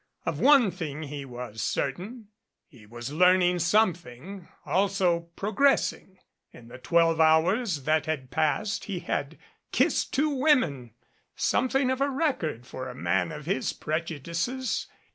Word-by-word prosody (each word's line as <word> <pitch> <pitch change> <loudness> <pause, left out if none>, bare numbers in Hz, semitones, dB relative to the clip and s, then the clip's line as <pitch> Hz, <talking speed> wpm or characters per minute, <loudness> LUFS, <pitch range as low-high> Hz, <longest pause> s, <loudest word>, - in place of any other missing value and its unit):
Of - - -2
one 270 -9 +5
thing 160 -3 -5
he 145 -1 -6
was 120 -4 -7
certain. 200 - -3 0.4
He 120 - -18
was 120 +5 -7
learning 180 +1 +4
some 185 +3 +3
thing, 175 +4 -11 0.2
also 185 -3 +1
progressing. 215 -3 +1 0.3
In 115 -1 -15
the 130 - -11
twelve 165 +3 +2
hours 160 - +3
that 155 +1 +1
had 135 -5 -3
passed 180 +7 0
he 200 -3 -4
had 145 +3 -3 0.3
kissed - - +1
two 300 +3 +1
women 255 - +1 0.4
something 260 0 +1
of 260 +1 -2
a 280 - +2
record 260 - -2
for 130 0 -7
a - - -9
man 85 - 0
of 150 -2 -8
his 195 +5 -1
prejudices. 170 - -3
170 Hz, 140 wpm, -27 LUFS, 140-210 Hz, 0.4 s, one